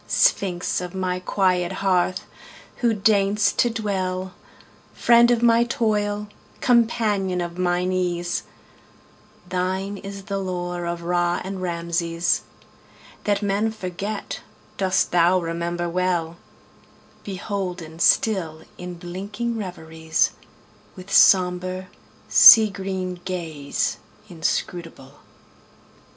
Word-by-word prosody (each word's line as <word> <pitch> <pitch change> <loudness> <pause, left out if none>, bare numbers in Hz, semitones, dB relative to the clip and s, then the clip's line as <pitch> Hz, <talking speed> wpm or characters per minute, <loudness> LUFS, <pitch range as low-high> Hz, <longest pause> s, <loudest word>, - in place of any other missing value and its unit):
Sphinx 180 -2 +1
of 180 +1 -7
my 185 -1 -2
quiet 180 -2 0
hearth! 185 -1 0 0.5
who 240 -2 +2
deign'st 200 -1 +2
to 240 - +3
dwellFriend 200 +3 0
of 240 -1 +2
my 235 0 +5
toil, 210 -3 -1 0.3
companion 215 -6 +1
of 175 0 -5
mine 180 0 0
ease, 175 -1 -1 1.1
Thine 190 +2 -2
is 200 0 -8
the 195 0 -3
lore 175 -2 -4
of 170 0 -4
Ra 175 0 0
and 190 0 -6
Rameses; 170 -1 -1 0.8
That 205 0 0
men 205 +2 0
forget 200 0 -5 0.4
dost 190 -1 +1
thou 175 +1 +4
remember 170 +1 -3
well, 170 -1 -1 0.9
Beholden 180 -4 -5
still 170 -5 +2 0.2
in 180 0 -7
blinking 200 +7 -5
reveriesWith 175 0 -5
sombre, 185 0 +3 0.4
sea 220 -3 +9
green 190 -2 -4
gaze 160 -6 -3 0.3
inscrutable. 165 -5 -4
185 Hz, 95 wpm, -23 LUFS, 175-200 Hz, 1.1 s, sea